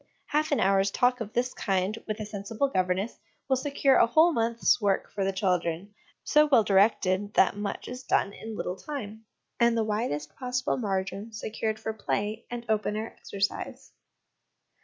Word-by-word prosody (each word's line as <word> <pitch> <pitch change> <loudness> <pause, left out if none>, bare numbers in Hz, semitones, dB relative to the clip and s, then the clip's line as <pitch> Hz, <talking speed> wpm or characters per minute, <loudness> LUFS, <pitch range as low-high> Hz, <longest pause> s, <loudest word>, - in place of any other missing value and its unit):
Half 305 +1 +1
an 285 - +2
hour's 195 +1 +3
talk 250 +4 +2
of 215 -2 -5
this 250 +1 0
kind 195 +1 0
with 215 0 -3
a 215 - -4
sensible 210 +5 -2
governess 185 0 -1 0.3
will 265 - +3
secure 275 0 +2
a - - +5
whole 320 +8 +5
month's 230 0 +2
work 200 -2 0
for 195 - -1
the 195 - +1
children, 185 0 -1 0.3
so 300 0 +4
well 265 -6 +5
directed 200 0 +2
that 190 - +4
much 205 -1 -4
is 250 +1 -6
done 200 -5 +1
in 220 +1 -7
little 180 - -3
time, 220 -5 -7 0.3
and 235 -1 +4
the 225 - +2
widest 210 -9 -2
possible 255 -1 -1
margin 195 -1 -3
secured 220 +1 -3
for 220 0 -3
play 215 +1 -2
and 240 -1 -6
open 210 -1 0
air 220 +1 -4
exercise. 200 0 -4
215 Hz, 170 wpm, -28 LUFS, 195-240 Hz, 0.3 s, a